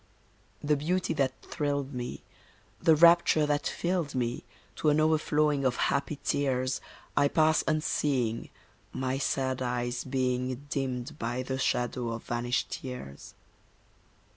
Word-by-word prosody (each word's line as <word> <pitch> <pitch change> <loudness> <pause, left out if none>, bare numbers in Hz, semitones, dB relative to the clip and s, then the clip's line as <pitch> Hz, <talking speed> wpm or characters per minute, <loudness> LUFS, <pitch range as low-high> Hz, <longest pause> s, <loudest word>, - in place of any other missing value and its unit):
The 150 +1 +3
beauty 170 +4 0
that 135 -4 -1
thrilled 140 -2 -2
me, 120 - -5 0.6
the 160 - +6
rapture 170 -1 +6
that 145 0 0
filled 170 -5 -1
me, 120 -1 -1 0.3
To 155 - +2
an 150 +1 +3
overflowing 150 -2 +2
of 130 -2 +2
happy 140 +1 0
tears, 130 -2 0 0.3
I 145 - +4
pass 155 +2 +3
unseeing, 140 -7 0 0.4
my 130 +1 -2
sad 130 -2 -1
eyes 120 0 -1
being 130 0 -1
Dimmed 135 +1 -3
by 120 +2 -2
the 130 +1 -3
shadow 125 -2 0
of 115 - -6
vanished 120 +1 -2
years. 125 - -8
135 Hz, 125 wpm, -29 LUFS, 125-150 Hz, 0.6 s, the